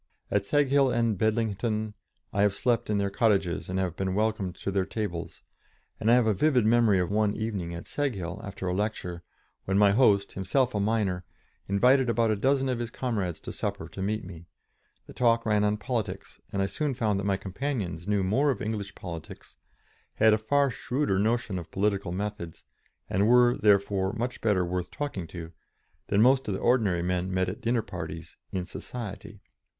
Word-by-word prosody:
At 100 -1 +1
Seghill 140 -2 +3
and 120 -1 +2
at - - -6
Bedlington 110 -1 0 0.4
I 100 - +1
have 100 -1 +3
slept 120 -3 0
in 105 - +1
their 100 -1 0
cottages 100 -7 +1
and 95 - -2
have 90 -3 -1
been 95 -1 -2
welcomed 105 -4 0
to 100 - -4
their 95 0 +1
tables, 95 -5 -5 0.6
and 110 - +1
I 120 - +7
have 125 -2 +4
a 110 - +3
vivid 125 +1 +3
memory 115 -3 +4
of 90 +1 -1
one 105 0 +2
evening 100 -6 -3
at 85 - -7
Seghill, 100 -11 -3
after 100 -1 -6
a 90 - 0
lecture, 90 -4 -3 0.4
when 95 +1 +1
my 100 -1 +6
host, 100 -3 +4
himself 125 +7 0
a 105 - 0
miner, 100 -4 0 0.4
invited 125 +6 +4
about 115 -1 +2
a - - +2
dozen 135 +5 +2
of 125 -2 -1
his 120 -1 -3
comrades 105 -9 -2
to - - -6
supper - - -4
to 95 - -8
meet 105 +2 -1
me; 85 -2 -11 0.6
the - - -12
talk 115 -2 +2
ran 105 -1 +2
on 105 0 +2
politics, 115 0 -4
and 100 0 0
I - - +2
soon 145 +6 -2
found 110 -5 0
that 100 - -3
my 100 -1 +2
companions 95 - -4
knew 105 -2 +1
more 130 +10 +2
of 125 -7 0
English 105 -2 -4
politics, 85 -3 -9 0.6
had 110 0 +5
a 110 - +2
far 140 +5 +2
shrewder 125 -3 -1
notion 110 -3 0
of 80 -2 -10
political 100 0 0
methods, 95 -3 -5 0.4
and 100 +3 +1
were, 125 +1 +5
therefore, 100 -1 +2
much 120 +1 -3
better 100 -5 +2
worth 90 0 -3
talking 120 - -4
to, 85 -1 -8 0.6
than 100 +2 +3
most 130 +2 +4
of 100 - -1
the - - -4
ordinary 105 -8 +2
men 90 +1 -1
met 95 0 +1
at 95 +3 -5
dinner 115 -1 +1
parties 80 -2 -7 0.2
"in 90 -1 -2
society." 105 0 -8
105 Hz, 190 wpm, -28 LUFS, 95-115 Hz, 0.6 s, I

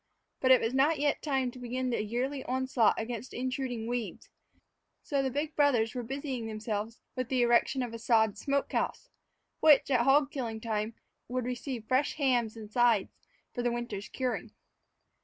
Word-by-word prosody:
But 260 - +2
it 260 - +7
was 225 +2 -1
not 290 +4 +3
yet 290 0 +1
time 265 -4 0
to 255 - -12
begin 250 +1 -2
the 235 - 0
yearly 255 +5 -2
onslaught 255 -3 +2
against 235 +1 -5
intruding 255 -2 -3
weeds, 240 -1 -4 0.7
so 280 -2 0
the 265 - 0
big 295 +4 -3
brothers 245 -7 +3
were 250 - -3
busying 260 -1 -4
themselves 215 0 -4
with 255 -2 -3
the 255 -2 +2
erection 240 +2 +3
of 240 -2 -5
a 230 - -6
sod 220 -3 +3
smoke 280 +6 -1
house, - - -2 0.5
which, 290 -3 +5
at 250 -3 +4
hog 275 +3 +4
killing 230 -5 -4
time, 220 0 -2 0.3
would 250 0 -2
receive 250 -1 -4
fresh 265 +3 +1
hams 245 -6 +1
and 215 -1 -9
sides 235 -4 +3 0.4
for 245 - -2
the 240 0 +1
winter's 235 -4 -4
curing. 255 -2 -2
245 Hz, 175 wpm, -30 LUFS, 230-265 Hz, 0.7 s, it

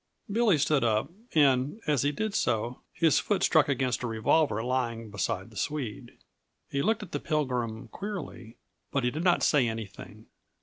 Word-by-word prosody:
Billy 220 -5 +3
stood 145 -1 +2
up, 110 +5 +1 0.2
and, 140 - +3
as 150 -4 +2
he 145 - +2
did 215 +7 -3
so, 120 - -1
his 165 -4 +3
foot 205 - 0
struck 155 -3 +4
against 130 -2 0
a 125 - -2
revolver 115 +1 +2
lying 115 -3 -2
beside 100 0 -2
the - - -16
Swede. 125 +1 -4 0.5
He 140 - 0
looked 215 +5 +1
at 185 - -11
the - - -2
Pilgrim 125 -8 -2
queerly, 190 - -7 0.3
but 135 - 0
he 125 - +1
did 155 +5 -3
not 180 -1 +3
say 140 -5 +4
anything. 110 -1 -7
130 Hz, 170 wpm, -28 LUFS, 115-155 Hz, 0.5 s, struck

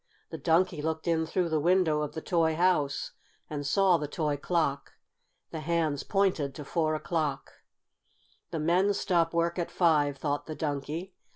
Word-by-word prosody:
The - - -6
Donkey 170 -1 +2
looked 160 +2 -3
in 160 -1 +1
through 175 +1 0
the 160 -1 +1
window 170 -2 +3
of 150 - -3
the 160 - -5
toy 165 -3 +1
house 160 -5 +1 0.4
and 145 -2 -3
saw 190 +2 +4
the 150 -2 -4
toy 150 -1 -1
clock. 145 -2 -1 0.6
The 160 - -4
hands 155 -2 0
pointed 185 -9 0
to 150 - -7
four 155 +1 0
o'clock. 155 -3 -2 1.0
"The - - -4
men 180 +6 +2
stop 170 -4 +1
work 170 +1 0
at 170 - -2
five," 150 -5 +2
thought 145 +1 -2
the 155 - -5
Donkey. 155 +5 -4
160 Hz, 165 wpm, -29 LUFS, 150-175 Hz, 1.0 s, saw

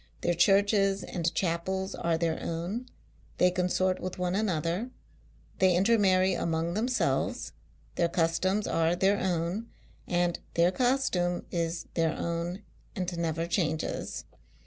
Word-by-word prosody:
Their 175 - +1
churches 195 +2 +3
and 170 -2 -1
chapels 190 +2 -1
are 170 -1 0
their 165 -1 -1
own; 180 +10 -3 0.5
consort 180 +1 +2
with 185 0 -5
one 180 0 -1
another, 190 +1 -1 0.7
they 185 -2 +4
inter 215 +6 +4
marry 190 -1 +4
among 165 +1 -1
themselves, 245 +5 0 0.4
their 170 -1 +1
customs 180 +5 +1
are 165 +1 +1
their 195 +3 +2
own, 180 +4 -1 0.4
and 175 -1 +1 0.2
their 170 +1 +4
costume 190 -7 +1
is 170 0 -2
their 165 -1 +1
own 170 +4 -3 0.3
and 180 -3 -3
never 165 -1 -1
changes. 160 -3 -2
180 Hz, 125 wpm, -29 LUFS, 170-195 Hz, 0.7 s, they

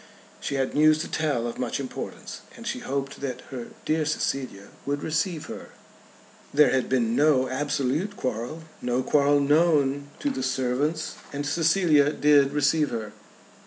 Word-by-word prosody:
She - - -3
had 135 -1 -1
news 155 +1 +5
to - - -4
tell 145 -7 -1
of 120 - -5
much 125 +2 -2
importance, 135 -2 -7 0.2
and - - -10
she - - -2
hoped 135 0 -4
that 135 -3 -4
her 125 -3 -6 0.2
"dear 155 0 +1
Cecilia" 135 -9 -2
would 145 +1 -2
receive 160 +1 -1
her. - - -8 0.8
There 145 -2 +5
had 130 -1 0
been 120 -3 +1
no 140 -2 +4
absolute 145 +8 -1
quarrel, 125 +6 -4 0.2
no 125 +1 0
quarrel 145 0 +3
known 145 -2 +2
to 285 - -1
the - - -4
servants, 130 +5 -1
and 145 0 -4
Cecilia 160 -1 +3
did 145 -2 +4
receive 150 +1 +2
her. 110 -2 -5
140 Hz, 155 wpm, -26 LUFS, 130-155 Hz, 0.8 s, news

